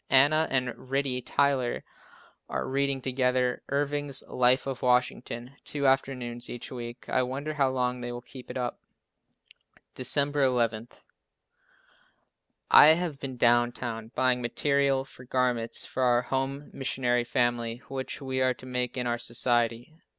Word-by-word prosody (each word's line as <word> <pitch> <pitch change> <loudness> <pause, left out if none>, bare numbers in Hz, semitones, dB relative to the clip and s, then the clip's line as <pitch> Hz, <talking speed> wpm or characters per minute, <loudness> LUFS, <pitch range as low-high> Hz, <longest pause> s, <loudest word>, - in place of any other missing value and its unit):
Anna 145 +4 +5
and 125 -1 -2
Ritie 135 -2 0
Tyler 140 -2 0 0.7
are - - -2
reading 135 -1 0
together 125 -1 +1
Irving's 145 -1 0
Life 125 +1 +3
of 135 -2 -4
Washington, 125 +1 0
two 145 -1 -3
afternoons 125 -3 0
each 120 0 -7
week. 120 -1 -7
I 130 - +2
wonder 135 +4 -3
how 140 -3 +2
long 125 -1 -1
they 120 0 -4
will 120 0 -7
keep 130 0 -11
it - - -5
up. 125 -1 -3 1.1
December 140 +3 +1
11. 120 -4 +1 1.8
I 145 - +10
have 165 -5 -3
been 130 -3 -6
down 120 0 +4
town 115 -2 -6
buying 130 -1 +2
material 140 +2 +1
for 125 - -13
garments 125 -2 0
for 130 - -4
our 125 -1 +3
Home 135 +3 -3
Missionary 125 -2 0
family 120 -1 -1
which 135 -1 -5
we 130 -1 -2
are 130 -1 +2
to - - -13
make 125 0 -2
in 125 - -1
our 120 0 -1
society. 120 +1 0
125 Hz, 145 wpm, -28 LUFS, 120-135 Hz, 1.8 s, I